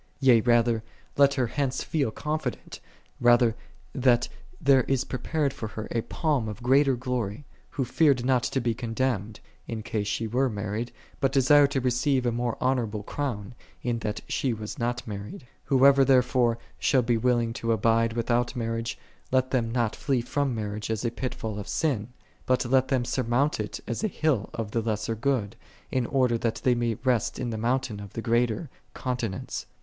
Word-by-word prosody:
Yea 125 -5 +5
rather, 120 -1 +3 0.3
let 140 0 +5
her 130 -3 +1
hence 135 +2 -1
feel 145 -7 0
confident, 150 +2 -4 0.4
rather, 120 -1 +5 0.4
that 125 -2 +3 0.3
there 135 -1 +5
is 135 -1 +1
prepared 140 +2 -1
for 115 -5 -5
her 110 0 -6
a 115 - 0
palm 140 -5 -1
of 105 +3 -8
greater 135 +1 +4
glory, 125 -1 -3 0.2
who 135 - -2
feared 135 -2 +3
not 130 -1 +3
to 135 - -1
be 120 -2 0
condemned, 115 -2 -2 0.3
in 110 -2 -4
case 105 -2 -2
she 115 +2 -1
were 125 +4 +1
married, 105 +2 -3 0.3
but 135 - +2
desired 140 +1 +5
to 140 -1 0
receive 130 +1 +1
a 120 - +2
more 120 0 -2
honorable 115 -5 0
crown, 120 -4 -4 0.3
in 120 -2 -1
that 105 -2 -3
she 130 -3 0
was 105 -1 -7
not 120 +1 -2
married. 105 +3 -7 0.2
Whoso 135 0 +6
therefore 125 -3 +3 0.2
shall 130 -3 +3
be 120 0 +2
willing 120 -1 +1
to 115 0 -2
abide 115 +1 +2
without 120 +2 0
marriage, 115 -1 -2 0.3
let 130 0 +2
them 115 -3 0
not 120 -3 0
flee 135 -4 0
from 135 +1 -1
marriage 105 0 -4
as 110 +1 -2
a 115 - +1
pitfall 110 -4 -4
of 100 - -7
sin; 130 -10 0 0.4
but 130 0 +2
let 130 +1 +3
them 130 -3 +1
sur 130 - -1
mount 125 +4 +1
it 105 0 -4
as 115 - -3
a - - +3
hill 155 - 0
of 110 -2 -4
the 115 - 0
lesser 110 0 -1
good, 115 -3 -1 0.4
in 125 -2 0
order 125 -4 +2
that 115 -1 0
they 125 - +4
may 120 -1 0
rest 125 -5 +1
in 125 -2 -3
the - - -3
mountain 120 -2 -1
of 100 -1 -9
the 115 - -4
greater, 120 +5 +1 0.3
continence. 120 -7 -3
120 Hz, 180 wpm, -27 LUFS, 115-130 Hz, 0.4 s, Whoso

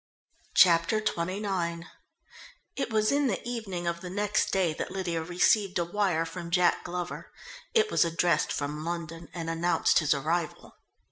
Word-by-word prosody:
Chapter 170 +4 +5
XXIX 185 -3 -2 0.9
It 275 - -2
was 215 -1 +2
in 285 0 +2
the 205 - -1
evening 205 -8 -4
of 170 0 -2
the 180 - -6
next 205 +2 0
day 185 -4 +1
that - - -4
Lydia 175 -4 -2
received 185 +4 +2
a 170 - 0
wire 175 -3 0
from 170 +1 -7
Jack 175 0 +2
Glover. 180 0 -5 0.4
It 440 -1 +3
was - - +4
addressed 170 +1 +1
from 150 +1 -3
London 165 0 -5
and 165 -1 -6
announced 165 +2 +2
his 150 -3 +2
arrival. 160 +3 -2
175 Hz, 150 wpm, -28 LUFS, 165-195 Hz, 0.9 s, Chapter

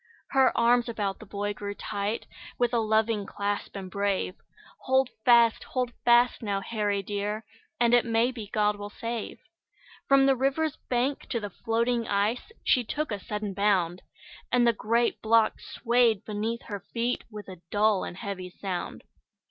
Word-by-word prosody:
Her 265 -1 +5
arms 240 +1 +4
about 205 -4 -2
the 215 - -12
boy 205 +1 -3
grew 205 0 -6
tight, 205 +2 -3 0.3
With 245 0 +1
a 235 - +3
loving 220 -1 +1
clasp, 205 0 -3
and 190 -2 -6
brave; 200 -2 0 0.5
"Hold 265 0 +2
fast! 235 -2 +5
Hold 250 -2 -2
fast, 240 +1 +5
now, 200 -3 -1
Harry 205 -1 -1
dear, 205 +2 -3 0.3
And 240 0 +3
it 245 - +6
may 230 +1 +2
be 225 -5 -7
God 210 0 +1
will 205 0 -6
save." 230 +1 -5 0.7
From 275 0 +5
the 270 -1 +4
river's 275 +4 0
bank 255 +3 0
to 235 - -1
the 205 -2 -6
floating 230 +3 0
ice 210 - 0
She 250 - +3
took 295 +4 -3
a 205 - -2
sudden 210 0 -4
bound, 185 -3 +1 0.5
And 245 -1 +4
the 235 - +4
great 230 +2 0
block 225 0 +3
swayed 235 -3 +1
beneath 220 +2 -3
her 205 -2 -5
feet 235 +4 -2
With 210 -2 -9
a 185 -3 -10
dull 210 -1 +2
and 175 - -6
heavy 190 -3 -5
sound. 180 -1 -5
220 Hz, 165 wpm, -27 LUFS, 205-240 Hz, 0.7 s, it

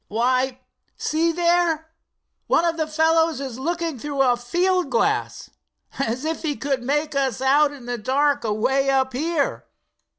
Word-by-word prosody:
Why, 255 +3 0 0.4
see 325 +2 +1
there, 340 -2 +1 0.6
one 340 - +3
of 335 -1 +1
the 315 -2 -2
fellows 320 0 +2
is 260 -3 -6
looking 330 -1 -2
through 280 +1 0
a 250 -2 +3
field 355 +9 0
glass 470 - -1 0.5
as 260 +1 -2
if 320 +1 -2
he 300 -3 -2
could 270 -2 -2
make 295 +4 -1
us 270 -2 0
out 280 +3 +3
in 275 -4 -11
the 245 -1 -4
dark 285 +5 +1
away 260 +6 +1
up 265 -1 +1
here!" 300 +2 -1
285 Hz, 155 wpm, -22 LUFS, 260-325 Hz, 0.6 s, one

